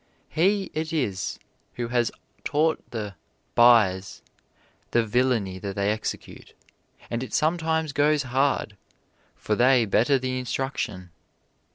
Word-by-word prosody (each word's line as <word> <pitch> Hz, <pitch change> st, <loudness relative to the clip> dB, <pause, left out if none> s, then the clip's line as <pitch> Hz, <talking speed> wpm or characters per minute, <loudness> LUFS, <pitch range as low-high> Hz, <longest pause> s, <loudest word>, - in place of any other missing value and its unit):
He 195 Hz, +4 st, +1 dB
it 155 Hz, 0 st, -3 dB
is 110 Hz, -, -2 dB, 0.4 s
who 120 Hz, -1 st, -3 dB
has 120 Hz, -1 st, +1 dB, 0.3 s
taught 155 Hz, +2 st, +1 dB
the 105 Hz, -4 st, -5 dB, 0.4 s
"byes" 105 Hz, -6 st, +4 dB, 0.7 s
the 120 Hz, -1 st, +2 dB
villainy 115 Hz, -5 st, 0 dB
that 100 Hz, 0 st, -5 dB
they 100 Hz, 0 st, +1 dB
execute; 110 Hz, +1 st, -6 dB, 0.6 s
and 115 Hz, 0 st, -1 dB
it 130 Hz, -, -4 dB
sometimes 160 Hz, -1 st, 0 dB
goes 145 Hz, +1 st, +2 dB
hard, 130 Hz, -5 st, 0 dB, 0.6 s
for 110 Hz, -, -2 dB
they 125 Hz, +1 st, +4 dB
better 115 Hz, +7 st, +3 dB
the 130 Hz, 0 st, -2 dB
instruction. 125 Hz, -8 st, -4 dB
125 Hz, 115 wpm, -25 LUFS, 105-145 Hz, 0.7 s, byes